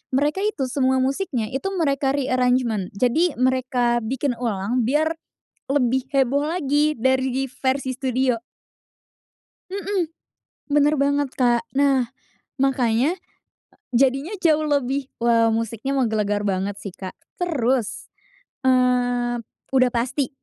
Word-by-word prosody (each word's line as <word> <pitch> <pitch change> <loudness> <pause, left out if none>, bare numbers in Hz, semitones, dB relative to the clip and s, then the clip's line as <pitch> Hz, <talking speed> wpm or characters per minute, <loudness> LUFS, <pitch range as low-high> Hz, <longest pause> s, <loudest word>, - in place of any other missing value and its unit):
mereka 295 +7 +1
itu 420 -10 -1
semua 260 0 +1
musiknya 265 - -1
itu 270 +9 -3
mereka 280 -5 +1
re-arrangement, 250 -6 +1
jadi 280 - +2
mereka 255 -2 +1
bikin 255 +2 -1
ulang, 230 +1 -1
biar 310 +4 +2 0.6
lebih 260 -2 +1
heboh 275 +1 +2
lagi 305 -2 +1
dari 260 +1 +1
versi 260 +1 -1
studio. 255 -2 0 1.3
Mhm 390 -2 -1 0.7
benar 295 +1 +4
banget 285 0 +1
Kak, 240 -2 +2
nah 270 -3 +3 0.5
makanya 265 +4 +2 0.8
jadinya 270 - +2
jauh 310 -2 +3
lebih 280 -2 0 0.2
wow 230 -1 +3
musiknya 230 +4 -2
menggelegar 215 -5 0
banget 200 0 -2
sih 200 - -5
Kak, 185 +1 -8 0.2
terus, 265 - -1 0.5
eee, 245 -2 +2 0.3
udah 255 -1 +4
pasti 245 +3 -1
260 Hz, 110 wpm, -22 LUFS, 240-280 Hz, 1.3 s, benar